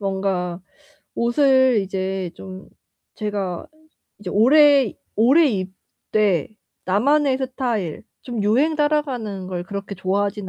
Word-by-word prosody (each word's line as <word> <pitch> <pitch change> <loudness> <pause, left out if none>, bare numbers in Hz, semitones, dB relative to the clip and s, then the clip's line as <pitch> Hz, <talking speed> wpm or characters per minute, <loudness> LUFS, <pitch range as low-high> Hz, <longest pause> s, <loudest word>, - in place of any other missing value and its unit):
뭔가 190 -3 -2 0.5
옷을 260 -1 +3
이제 190 -1 -3
좀 190 0 -10 0.5
제가 200 -5 -4 0.5
이제 200 -3 -7
오래 275 +2 +5 0.2
오래 270 +10 +5
입되 190 - -2 0.4
나만의 265 +8 +2
스타일 245 - -3 0.2
좀 240 -5 -4
유행 265 +10 +2
따라가는 265 -10 -1
걸 175 -1 -4
그렇게 200 +2 -6
좋아하진 200 +1 -2
210 Hz, 220 characters per minute, -21 LUFS, 190-260 Hz, 0.5 s, 오래